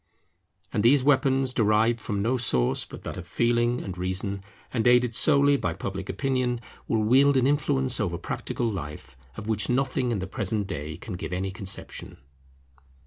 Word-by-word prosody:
And - - +1
these 130 +4 +5
weapons, 135 -2 +3
derived 110 +1 +2
from 100 -1 -2
no 120 +4 +1
source 65 - +2
but - - -11
that - - -6
of - - -8
Feeling 120 +1 +1
and 95 -2 -6
Reason, 95 +2 -2 0.3
and 115 -2 +1
aided 125 -1 +4
solely 140 0 +4
by 90 -9 -2
Public 95 +2 -5
Opinion, 130 -3 -1 0.3
will 110 -1 +1
wield 135 +5 +5
an 130 - +3
influence 135 -3 +2
over 90 -6 -1
practical 115 +6 -3
life, 75 - -6 0.2
of 110 - -6
which 110 -2 0
nothing 130 0 0
in 115 - 0
the 95 - -3
present 100 +2 -1
day 80 -5 -5
can 105 - -8
give 85 -2 -5
any 95 +2 -2
conception. 100 -1 -6
115 Hz, 170 wpm, -26 LUFS, 95-130 Hz, 0.3 s, these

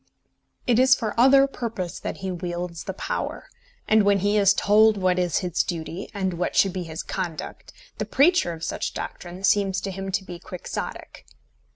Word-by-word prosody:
It 240 -1 +3
is 260 0 +6
for 220 -4 -3
other 270 +3 +6
purpose 225 -9 -5
that - - -5
he 190 - -1
wields 175 -1 -5
the - - -4
power; - - -4 0.4
and 220 0 +5
when 200 0 +4
he 205 +2 +2
is 200 -2 +5
told 215 +1 +4
what 185 -1 +1
is 175 -3 +1
his 175 -1 +1
duty, 170 +2 -5
and 190 -3 -2
what 180 - -1
should 195 -2 +4
be 185 - -3
his 160 -2 -6
conduct, 170 -4 -5 0.3
the - - -1
preacher 290 - +3
of 165 -1 -8
such - - -3
doctrine 180 +2 -7
seems 195 -1 +2
to 195 - -4
him 195 +1 -5
to 190 - 0
be 175 -2 -9
quixotic. 180 +1 -7
190 Hz, 185 wpm, -24 LUFS, 175-215 Hz, 0.4 s, is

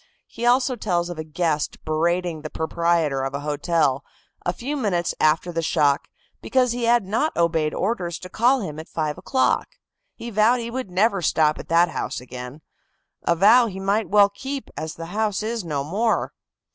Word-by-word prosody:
He 240 - -4
also 255 +1 +3
tells 175 -6 -1
of 170 - -7
a - - -2
guest 155 -1 -2
berating 170 +1 0
the 155 - -6
proprietor 160 -3 0
of 135 +1 -3
a 140 - -3
hotel, 145 -2 0 0.4
a 175 - 0
few 265 +10 -4
minutes 195 - 0
after 160 +3 +2
the 165 -1 -1
shock, 145 -3 +1 0.3
because 255 -2 +2
he 240 0 -2
had 235 -2 +3
not 225 +11 -1
obeyed 165 -2 +1
orders 185 -5 -2
to 180 - -9
call 245 +7 +2
him 155 -6 -5
at 160 - -9
five 155 0 -2
o'clock. 260 +8 0 0.4
He 235 - -7
vowed 220 +4 +3
he 235 0 -5
would 255 -4 -4
never 195 +2 +2
stop 155 -1 +2
at - - -9
that 170 +1 +4
house - - -4
again, 125 +3 -9 0.6
a 170 - +1
vow 225 +7 +6
he 190 -3 -6
might 200 +3 0
well 205 0 +6
keep, 265 +7 -6
as 155 0 -5
the 165 - -7
house 215 -1 0
is 225 -1 -2
no 145 -5 -2
more. 210 +10 0
175 Hz, 185 wpm, -23 LUFS, 155-225 Hz, 0.6 s, vow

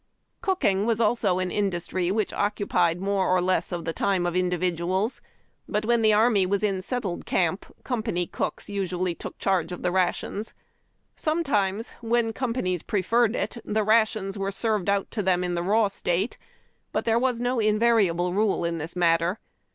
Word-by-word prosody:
Cooking 230 - +1
was 230 -1 +1
also 210 -5 +2
an 185 -1 -1
industry 185 -2 -1
which 210 +1 0
occupied 180 -4 +1
'more 195 0 0
or 185 0 +4
less 185 +1 0
of 170 -2 -4
the 165 - -2
time 190 -1 0
of 175 0 -1
individuals; 180 +3 0 0.5
but 210 +1 -1
when 235 0 +3
the 220 -1 +5
army 215 -1 +4
was 200 +2 0
in 195 -3 0
settled 200 -4 -4
camp 185 +1 0 0.2
company 220 -8 -1
cooks - - -4
usually 185 -3 -2
took - - -8
charge 190 -3 0
of 180 - -6
the 180 - +1
rations. 190 +3 -1 0.6
Sometimes, 230 - 0
where 230 -1 +1
companies 230 -9 -1
preferred 225 +3 +1
it, - - -3
the 215 +1 0
ra 220 +2 +5
tions 200 -2 -5
were 195 0 -1
served 210 -2 0
out 200 -1 0
to 220 - -2
them 180 -2 +2
in 180 0 -1
the 170 - -1
raw 210 +4 +3
state; 195 +1 -1 0.6
but - - -2
there 230 0 +3
was 250 -2 0
no 245 0 0
invariable 210 -5 +2
rule 200 -3 +1
in 170 -1 -2
this 160 +4 -6
matter. 170 +2 +2
195 Hz, 175 wpm, -25 LUFS, 180-220 Hz, 0.6 s, the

